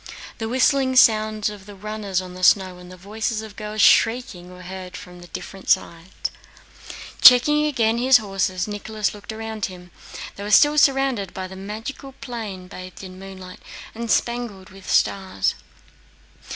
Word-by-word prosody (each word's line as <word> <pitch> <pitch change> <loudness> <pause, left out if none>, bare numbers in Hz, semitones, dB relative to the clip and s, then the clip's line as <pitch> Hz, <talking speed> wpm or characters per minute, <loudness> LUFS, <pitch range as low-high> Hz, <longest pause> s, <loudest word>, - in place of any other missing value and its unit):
The 225 -1 -3
whistling 260 +1 +2
sound 215 -3 +4
of 200 -2 -12
the 205 - -10
runners 205 -2 -3
on 180 -1 -9
the 185 - -10
snow 185 -1 +3
and 180 0 -13
the 185 - -11
voices 215 +4 -3
of 215 -2 -11
girls 210 0 -2
shrieking 225 -7 +3
were 180 0 -12
heard 185 0 -8
from 180 0 -12
different 180 +2 -9
sides. 170 +2 -1 0.9
Again 295 +4 +7
checking 230 -3 +1
his 255 +1 +6
horses, 195 -3 -2
Nicholas 210 0 -3
looked 205 +1 -9
around 220 -1 -4
him. 180 -1 -10 0.5
They 200 - -6
were 205 - -5
still 295 +8 +6
surrounded 270 -9 +2
by 185 -1 -4
the 190 - -11
magic 210 +7 -6 0.2
plain 210 -7 -7
bathed 185 +1 -10
in 185 -1 -10
moonlight 190 -1 -10 0.3
and 230 0 -6
spangled 235 -6 -1
with 195 0 -12
stars. 190 - +1
205 Hz, 155 wpm, -22 LUFS, 185-225 Hz, 0.9 s, Again